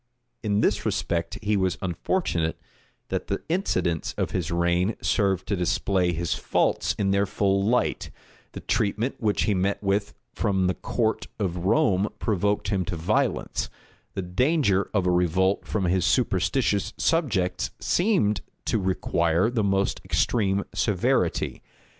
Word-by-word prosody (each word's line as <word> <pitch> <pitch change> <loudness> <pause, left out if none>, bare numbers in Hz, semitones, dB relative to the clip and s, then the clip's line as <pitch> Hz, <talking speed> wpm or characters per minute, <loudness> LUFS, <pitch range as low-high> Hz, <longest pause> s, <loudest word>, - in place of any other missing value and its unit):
In 105 -1 +1
this - - +1
respect 85 -1 -1
he 105 +1 +1
was 95 -2 +1
unfortunate, 85 - -1 0.5
that - - -2
the 100 - -3
incidents 125 - 0
of - - -1
his 90 -3 -2
reign 85 +4 +1
served 95 -4 +1
to 100 - 0
display 90 0 +1
his 85 -1 -1
faults - - 0
in 100 -1 +1
their 100 +1 +2
full 100 0 +1
light: 120 +5 +1 0.4
the - - -7
treatment 110 +5 0
which 105 -2 +1
he 105 - +2
met 95 +1 +1
with 100 +2 0 0.2
from 95 -4 +1
the 90 - +2
court 110 +2 -1
of 90 -4 -2
Rome 105 -6 +3
provoked 105 -1 0
him 95 -3 +1
to 85 - -3
violence; 80 0 0 0.5
the 95 - -2
danger 100 - +1
of 95 -4 +1
a 90 - +3
revolt 90 +2 +1
from 105 - -1
his 90 0 +2
superstitious 100 -1 +1
subjects 125 - 0
seemed 175 - +2 0.2
to 110 - +1
require 90 +1 +1
the 115 -3 0
most 100 0 0
extreme 100 -4 +1
severity. 100 -5 0
100 Hz, 140 wpm, -25 LUFS, 90-105 Hz, 0.5 s, Rome